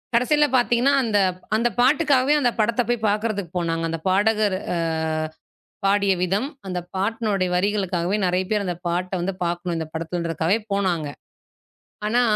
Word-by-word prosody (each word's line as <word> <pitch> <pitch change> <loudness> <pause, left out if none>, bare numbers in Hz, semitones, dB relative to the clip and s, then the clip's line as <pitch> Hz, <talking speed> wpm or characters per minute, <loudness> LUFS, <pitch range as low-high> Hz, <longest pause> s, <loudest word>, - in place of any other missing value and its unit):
கடசில 295 +5 +4
பாத்தீங்கன்னா, 245 +2 +3
அந்த 220 -3 +1 0.4
அந்தப் 235 +2 0
பாட்டுக்காகவே 280 0 +3
அந்தப் 245 -3 +1
படத்தப் 230 +2 +1
போய்ப் 240 -2 0
பாக்குறதுக்கு 205 -4 -2
போனாங்க. 165 -1 -1
அந்தப் 165 +2 -4
பாடகர் 205 +1 +2 0.2
அ - - -1 1.1
பாடிய 200 0 +3
விதம், 195 +9 0 0.2
அந்தப் 180 -1 -5
பாட்னுடைய 200 -1 0
வரிகளுக்காகவே 190 -1 0
நறைய 180 +1 +1
பேர் 210 -1 +1
அந்தப் 180 0 -5
பாட்ட 180 +2 -2
வந்து 190 +2 -1
பாக்கணும். 175 0 -2
இந்தப் 160 -1 -6
படத்துலன்றதுக்காகவே 165 +3 -1
போனாங்க. 180 -6 0 1.0
ஆனா, 240 +3 +3
200 Hz, 135 wpm, -23 LUFS, 175-230 Hz, 1.1 s, கடசில